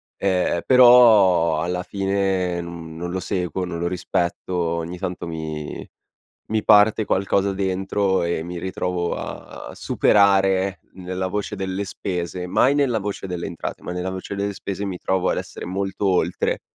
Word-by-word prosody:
Eh, 90 -3 0
però 110 -10 +6
alla 90 +2 -2
fine 95 -2 -1
non 85 -2 -8
non 85 +2 -5
lo 95 - -2
seguo, 90 -1 -2
non 85 -1 -5
lo 85 - -1
rispetto, 90 0 -2
ogni 85 0 -2
tanto 90 -1 -4
mi 80 -2 -5 0.7
mi 110 -1 0
parte 105 +1 +5
qualcosa 100 0 +1
dentro 95 0 0
e 85 -1 -1
mi 85 +1 -6
ritrovo 90 -1 -2
a - - -8
superare 95 -2 +3
nella 95 0 -4
voce 105 +2 -3
delle 95 +1 -3
spese, 90 -2 -4
mai 125 +9 +3
nella 135 -6 +1
voce 100 -1 -4
delle 90 -2 -4
entrate, 85 - -6
ma - - -5
nella 90 +1 -3
voce 95 +1 -5
delle 100 0 -2
spese 100 +1 -4
mi 95 -2 -4
trovo 95 +1 0
ad - - +1
essere - - -6
molto 95 +2 -2
oltre 90 -2 0
95 Hz, 155 wpm, -22 LUFS, 90-100 Hz, 0.7 s, però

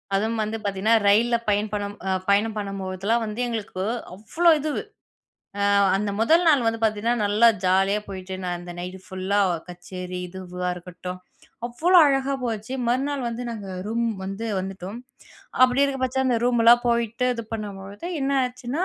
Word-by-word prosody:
அதுவும் 220 +3 0
வந்து 215 +1 -3
பார்த்தீங்கன்னா, 200 +2 +1
ரயில்ல 235 +4 +4
பயண் 210 +1 +1
பணும் 205 -1 -3
அ - - +1 0.2
பயணம் 210 +2 +3
பண்ணும்போதெல்லாம் 195 +2 -2
வந்து 215 +2 -6
எங்களுக்கு 210 -5 -4 0.3
அவ்ளோ 220 - +1
இதுவு. 300 0 -2 0.8
அ - - 0 0.3
அந்த 205 +1 -1
1 325 +10 +4
நாள் 285 -6 +4
வந்து 225 0 0
பார்த்தீங்கன்னா, 220 +2 +1
நல்லா 210 +3 +5 0.2
ஜாலியா 195 +3 +3
போயிட்டு, 190 -1 -6
நான் 175 -1 -2
அந்த 175 0 -8
நைட்டு 180 +1 -6
ஃபுல்லா 190 +2 -1 0.3
கச்சேரி, 180 +1 -7
இதுவா 180 0 -5
இருக்கட்டும், 180 +1 -8 0.5
அவ்ளோ 345 +10 +4
அழகா 275 -1 +1
போச்சு. 225 +1 -3
மறுநாள் 270 +1 0
வந்து 235 +1 -5
நாங்க 210 -4 -7 0.2
ரூம் 235 +1 0 0.2
வந்து 195 +4 -4
வந்துட்டோம். 190 +3 -6 0.6
அப்பிடி 255 +2 +5
இருக்க 275 -1 -2
பட்ச 260 +1 -2
அந்த 245 -2 +2
ரூம்லாம் 240 0 +5
போயிட்டு 235 +1 0
இது 230 - -4
பண்ணும்பொழுது 205 - -6
என்ன 275 +1 0
ஆச்சுன்னா 250 +7 -3
215 Hz, 155 wpm, -24 LUFS, 195-240 Hz, 0.8 s, நல்லா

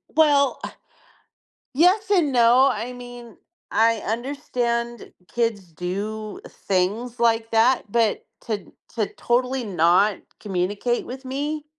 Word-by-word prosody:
Well, 285 -4 +4
ah - - -7 1.0
yes 370 +8 +3
and 340 -8 +3
no, 245 +2 +5
I 230 +4 -4
mean, 245 -2 -11 0.3
I 230 +1 +3
understand 235 0 -3 0.2
kids 220 -7 -2
do 205 +5 -5
things 205 +6 -2
like 225 -1 +2
that, 225 -1 +3
but, 225 -1 +1 0.2
to 205 -5 -4 0.2
to 215 -3 +1
totally 250 +2 0
not 185 +1 +3 0.2
communicate 205 +5 -1
with 265 +2 -8
me 290 +3 -3
235 Hz, 110 wpm, -23 LUFS, 210-255 Hz, 1.0 s, no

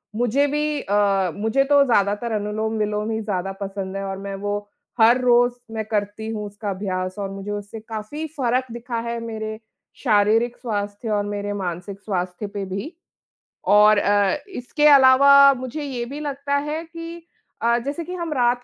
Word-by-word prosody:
मुझे 245 +5 +2
भी 300 +1 -1
अ, 200 -3 +2
मुझे 225 +6 +1
तो 285 -1 +7
ज़्यादातर 210 -1 +1
अनुलोम-विलोम 215 0 -1
ही 220 - -1
ज़्यादा 195 -3 -2
पसंद 195 -1 -4
है 195 - -4
और 195 0 -4
मैं 195 0 -6
वो 205 0 0 0.4
हर 230 +3 +6
रोज़ 245 0 +4 0.2
मैं 220 -1 -3
करती 210 0 -3
हूँ 215 -2 -4
उसका 205 +1 -6
अभ्यास 185 -1 -3
और 200 -1 -3
मुझे 195 +1 -6
उससे 205 +2 -6
काफ़ी 220 +8 -6
फ़र्क 255 -1 +1
दिखा 235 0 -4
है, 235 0 -3
मेरे 220 -1 -5 0.4
शारीरिक 220 +3 +3
स्वास्थ्य 205 -1 -4
और 205 -1 +1
मेरे 205 0 -3
मानसिक 190 0 -5
स्वास्थ्य 185 0 -3
पे 200 -1 -5
भी 195 - -5 0.8
और 210 0 +7
अ, 205 +3 +2
इसके 295 -2 +1
अलावा 280 0 +7 0.2
मुझे 255 +4 -5
ये 260 -4 -3
भी 280 +5 -7
लगता 280 -1 -2
है 315 +2 -3
कि 335 0 -9 0.4
अ, 235 +1 +3
जैसे 285 +4 -3
कि 355 +3 -7
हम 340 -3 -3
रात 245 -2 +1
220 Hz, 165 wpm, -22 LUFS, 205-255 Hz, 0.8 s, तो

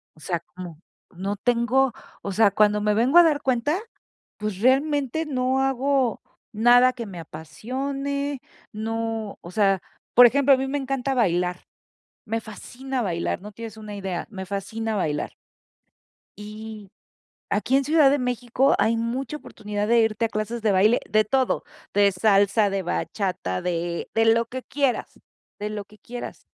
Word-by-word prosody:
O - - -20
sea, 170 +2 -2
como 175 -2 -10 0.4
no 195 +3 -3
tengo 245 +3 +2 0.3
o 200 - -4
sea, 205 +1 +4
cuando 210 +1 +3
me 210 0 +2
vengo 245 +9 +3
a 345 - +10
dar 305 -3 +2
cuenta, 260 +5 +1 0.6
pues, 210 -3 -4
realmente 280 +4 +2
no 260 -2 0
hago 270 -2 +1 0.3
nada, 245 +3 +5
que 240 -2 -6
me 190 -4 -8
apasione, 270 - -4 0.3
no, 225 -1 -3
o 175 - -10
sea, 195 -2 +2 0.3
por 245 - +9
ejemplo, 275 +3 +5
a - - +4
mí 265 +1 -2
me 280 +2 -1
encanta 270 -1 -2
bailar, 180 -6 0 0.6
me 225 0 -1
fascina 255 +4 -6
bailar, 175 -3 -2
no 210 - -9
tienes 225 +1 -8
una 210 -1 -8
idea, 190 -3 -4
me 190 -3 -7
fascina 215 +3 -3
bailar. 155 -7 -1 1.1
Y, 210 0 -9 0.6
aquí 220 +6 +1
en 275 - +2
Ciudad 300 -1 +5
de 285 - +2
México, 250 +1 +1
hay 230 +1 +2
mucha 240 +5 -3
oportunidad 210 -7 -5
de 235 0 +5
irte 220 0 +1
a - - +1
clases 215 +2 -3
de 215 -2 +3
baile, 205 +5 +4
de 215 0 +3
todo, 260 +4 0 0.3
de 200 0 +5
salsa, 200 +2 +3
de 195 0 -1
bachata, 180 - -2
de 170 -1 -2
de 225 - +3
lo 230 +1 +4
que 255 +2 -6
quieras, 275 -2 -2 0.4
de 210 +1 -4
lo 210 -1 -5
que 210 +1 -20
quieras. 240 +4 -8
225 Hz, 160 wpm, -24 LUFS, 200-260 Hz, 1.1 s, a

